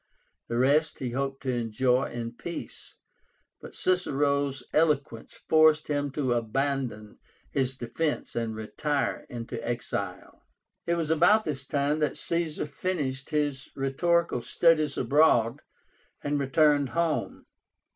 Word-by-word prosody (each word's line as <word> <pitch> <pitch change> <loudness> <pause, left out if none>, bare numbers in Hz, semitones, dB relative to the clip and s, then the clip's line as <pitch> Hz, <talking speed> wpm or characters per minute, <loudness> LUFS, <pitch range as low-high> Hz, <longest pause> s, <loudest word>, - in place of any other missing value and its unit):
The 115 - -2
rest 145 +5 +3
he 125 -3 -4
hoped 135 +2 -3
to 130 - 0
enjoy 125 +3 +1
in 115 -1 -5
peace, 170 +8 -8 0.7
but - - -11
Cicero's 140 -7 +1
eloquence 145 -7 0
forced 155 -1 +5
him 145 -1 0
to 135 -4 0
abandon 120 -2 -2 0.3
his 130 0 -1
defence 140 +6 -3
and 115 -2 -2
retire 140 +6 -2
into 115 -2 -6
exile. 100 -6 -4 0.5
It 170 - +2
was 165 -2 -1
about 175 +7 +5
this 140 -5 -4
time 145 +1 0
that 150 - 0
Caesar 170 -3 -1
finished 145 -5 -3
his 145 -3 -1
rhetorical 150 +2 +1
studies 155 +1 +2
abroad, 140 -4 +3 0.6
and 145 0 0
returned 145 0 +3
home. 170 -2 -1
140 Hz, 120 wpm, -27 LUFS, 125-155 Hz, 0.7 s, forced